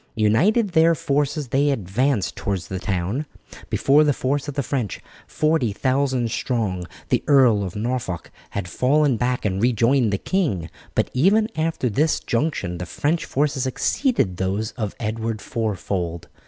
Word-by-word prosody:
Uniting 155 - +3
their 165 -3 +4
forces 145 -1 -1
they 140 +3 +2
advanced 120 0 0
towards 95 -4 -3
the 95 - -3
town. 100 - -2 0.4
Before 145 +3 +4
the 145 -1 +3
force 140 +2 -1
of 145 - -5
the 140 - 0
French, 125 -8 -2 0.3
40,000 130 -3 +1
strong, 105 -10 -2 0.2
the 125 - +1
Earl 130 -7 +5
of 90 -2 -5
Norfolk 110 -5 -3 0.2
had 100 -3 -4
fallen 140 +6 +2
back 125 +1 -1
and 95 -1 0
rejoined 120 0 +3
the 100 - +1
king, 100 - -1 0.2
but - - +1
even 205 - +3
after 160 -4 -1
this 150 +8 +1
junction 115 - -2
the 90 - -5
French 160 - -1
forces 140 -2 0
exceeded 130 - 0
those 100 +4 -1
of 105 -4 -4
Edward 110 0 -2
fourfold. 95 -7 -3
125 Hz, 145 wpm, -22 LUFS, 100-145 Hz, 0.4 s, Earl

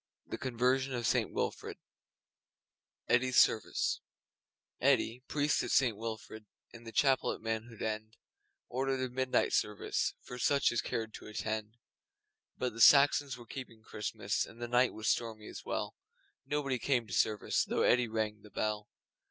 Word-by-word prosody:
THE - - -6
CONVERSION 130 +1 +1
OF 120 -1 -2
ST 115 - +2
WILFRID - - -3 1.3
Eddi's 130 +1 +2
Service 110 - +3 0.8
Eddi, 120 +3 +2
priest 145 0 +1
of - - -4
St 125 -5 +3
Wilfrid 110 0 -7 0.3
In 115 0 -12
the 115 - -7
chapel 135 +2 +3
at - - -9
Manhood 115 0 -4
End, 110 0 -3 0.5
Ordered 135 +1 -1
a 125 -1 -4
midnight 130 0 +1
service 105 -1 0
For 125 - -8
such 140 +3 +3
as 120 - 0
cared 110 -1 -3
to - - -10
attend. 110 +1 -4 0.8
But 125 -2 -2
the 115 - -4
Saxons 140 0 +6
were 120 - -12
keeping 115 -3 -9
Christmas, 105 -1 -2
And 115 - -11
the 120 - -4
night 125 +1 +3
was 110 - -4
stormy 110 -2 -1
as - - -9
well. - - -3 0.5
Nobody 140 -3 -1
came 125 -3 +1
to 105 - -9
service 105 -2 +1
Though - - 0
Eddi 125 0 +4
rang 110 -1 -2
the 105 - -14
bell. 105 +1 -2
115 Hz, 155 wpm, -32 LUFS, 110-130 Hz, 1.3 s, Saxons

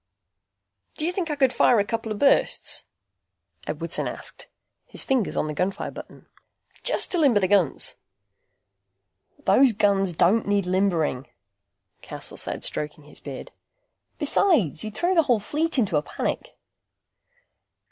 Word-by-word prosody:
"Do 305 - -1
you 345 - +1
think 360 -3 -2
I 300 - -1
could 265 -3 +2
fire 240 - +4
a 200 - +2
couple 225 0 -3
of 210 - -2
bursts?" 275 +5 +2 0.8
Edwardson - - -1
asked, - - -7 0.4
his - - -4
fingers 255 -7 0
on - - +1
the 155 - -3
gunfire 185 +5 -2
button. - - -11 0.6
"Just - - -1
to 360 - +1
limber 270 -9 +5
the 190 - +1
guns?" 200 +1 +1 1.5
"Those 265 -4 +5
guns 195 -4 +2
don't 200 +8 +3
need 200 -2 +2
limbering," 175 -8 0 0.7
Cassel - - -6
said, - - -3
stroking 150 0 -3
his 150 - -11
beard. 135 -3 -8 0.7
"Besides, 230 - +2
you'd 215 -1 -6
throw 355 +2 +1
the 335 - +5
whole 245 -7 +2
fleet 305 +9 -2
into 195 -10 +2
a - - +2
panic." - - -4
205 Hz, 140 wpm, -25 LUFS, 180-275 Hz, 1.5 s, limber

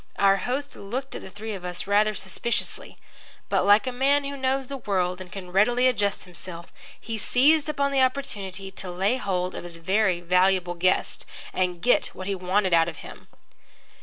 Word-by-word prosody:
Our 195 0 +5
host 275 +6 -3
looked 255 +7 -5
at - - -6
the - - -9
three 215 +3 -6
of 190 -3 -7
us 180 -1 -4
rather 210 +1 +3
suspiciously. 195 +6 -2 0.5
But, - - +1
like 205 +4 +6
a 255 - -1
man 275 +3 +2
who 280 0 -4
knows 265 0 0
the 275 +2 -6
world 185 -5 -1
and 180 -1 -10
can 185 -3 -8
readily 240 +7 +4
adjust 205 -5 0
himself, 175 -1 -10 0.3
he 225 -1 -5
seized 295 +7 +3
upon 280 -2 0
the 270 -1 +3
opportunity 200 -8 -2
to 190 -1 -6
lay 195 +7 +1
hold 185 -5 -2
of - - -6
his 175 -1 -8
very 190 +1 +1
valuable 180 0 +2
guest 185 +2 0 0.3
and 180 -2 -1
get 245 - +4
what 185 - -7
he 200 - -1
wanted 185 0 0
out 165 0 +4
of 160 - -9
him. - - -12
200 Hz, 190 wpm, -25 LUFS, 180-255 Hz, 0.5 s, like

